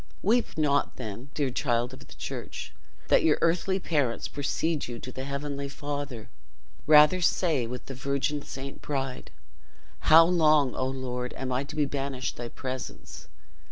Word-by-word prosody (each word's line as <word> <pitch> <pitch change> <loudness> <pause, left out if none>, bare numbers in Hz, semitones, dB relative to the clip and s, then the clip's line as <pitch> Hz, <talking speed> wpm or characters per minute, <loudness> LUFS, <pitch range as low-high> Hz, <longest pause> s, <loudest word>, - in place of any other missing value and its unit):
Weep 230 -1 +2
not, 145 -2 +2
then, 120 +2 -7
dear 140 -4 0
child 120 -1 0
of 130 - -10
the - - -13
church, - - -6 0.4
that - - +6
your 155 -2 +4
earthly 180 +3 +2
parents 145 -10 0
precede 145 +2 -1
you 120 -1 -5
to 130 - -7
the 130 +1 -6
Heavenly 140 0 -4
Father; 140 -4 -5 0.6
rather 150 +4 +7
say, 160 -8 +2
with 125 +1 -6
the 135 - -6
Virgin 140 +3 -1
Saint 135 0 -8
Bride, 135 -3 -3 0.7
'How 165 +1 +8
long, 155 -6 +4
O 130 - -1
Lord, 125 -1 -4
am 130 -1 -3
I 125 +2 0
to - - -9
be 150 -1 +2
banished 135 -2 -3
thy 120 - -4
presence? 130 +2 -7
140 Hz, 155 wpm, -28 LUFS, 130-150 Hz, 0.7 s, How